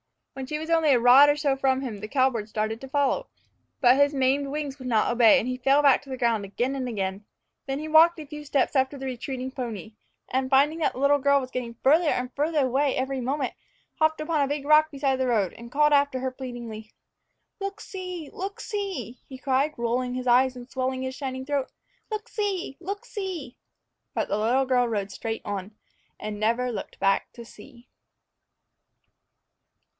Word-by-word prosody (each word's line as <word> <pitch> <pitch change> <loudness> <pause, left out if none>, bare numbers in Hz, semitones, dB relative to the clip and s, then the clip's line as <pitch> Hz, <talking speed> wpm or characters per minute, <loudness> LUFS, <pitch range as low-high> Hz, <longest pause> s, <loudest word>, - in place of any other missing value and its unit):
When 265 -1 -6
she 300 - -3
was 320 +2 -5
only 325 -2 +3
a 260 -4 +5
rod 255 +4 +8
or 290 - +3
so 290 -2 +1
from 265 -1 +1
him, 235 -7 -5
the 215 - -6
cowbird 245 -4 0
tried 220 +1 -2
to 270 - -8
follow. 285 - 0 0.5
But 250 0 +6
his 285 +1 +3
maimed 270 +1 +2
wings 285 -1 -4
would 255 - -7
not 225 -2 +2
obey, 235 -2 +6
and 235 - -1
he 255 0 -2
fell 275 +3 +3
back 275 -2 +5
to 280 - -16
the 260 - -4
ground 230 -4 +1
again 240 +7 -2
and 265 -2 -3
again. 195 -3 -3 0.4
Then 270 0 -2
he 305 +2 -5
walked 325 +2 +6
a 305 - -7
few 300 +1 -8
steps 285 -1 0
after 265 +1 +1
the 270 - -7
retreating 260 0 -4
pony, 230 -4 -6 0.4
and, 260 0 -1
finding 285 +4 +3
that 310 - +1
the - - -8
little 285 +1 +4
girl 280 +1 +4
was 255 -1 -7
getting 235 -2 -4
farther 310 +4 +4
and 250 -2 -2
farther 295 -1 +1
away 270 +2 +1
every 265 0 -2
moment, 265 +1 -2 0.5
hopped 315 0 +2
upon 305 -1 0
a 280 - +2
big 285 0 -3
rock 305 +1 +5
beside 275 -2 0
the 260 0 0
road, 210 -7 +1
and 235 +1 -12
called 300 +2 +3
after 280 -2 +3
her 260 0 -2
pleadingly. 240 -4 -8 0.7
"Look 395 +1 -5
see! 365 -6 -7
look 390 +2 -5
see!" 385 - -4
he 265 - -8
cried, 275 +3 0
rolling 245 +1 -1
his 255 0 -4
eyes 255 +1 +4
and 245 -1 -9
swelling 260 0 -2
his 260 0 -3
shining 260 -1 -5
throat; 280 -2 -1 0.4
"look 430 -1 -4
see! 395 -9 -3
look 395 +4 -6
see!" 360 - -6 0.6
But - - -1
the 205 - 0
little 250 +5 +2
girl 250 -1 +2
rode 205 -3 -2
straight 225 -1 -5
on, 205 0 -5 0.4
and 210 -1 -5
never 235 +3 +1
looked 210 - -7
back 195 0 +1
to 235 -2 -10
see. 235 +3 -16
265 Hz, 200 wpm, -26 LUFS, 245-290 Hz, 0.7 s, rod